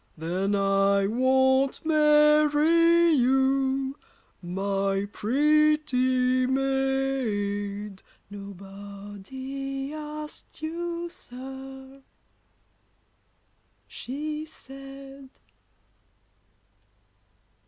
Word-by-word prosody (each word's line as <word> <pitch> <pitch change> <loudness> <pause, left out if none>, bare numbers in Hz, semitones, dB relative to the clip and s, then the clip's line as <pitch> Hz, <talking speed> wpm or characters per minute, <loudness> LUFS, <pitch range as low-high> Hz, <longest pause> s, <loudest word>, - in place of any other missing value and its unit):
Then 185 +5 -1
I 195 0 +2
won't 265 +5 +2
marry 305 +2 +5
you, 265 0 +2 0.5
my 195 +2 -1
pretty 255 -1 +2
maid. 250 -7 -1 0.3
Nobody 205 +8 -7
asked 300 0 -8
you, 340 +1 -3
sir, 265 -3 -10 1.9
she 300 +4 -5
said. 275 -2 -11
265 Hz, 50 wpm, -26 LUFS, 205-300 Hz, 1.9 s, marry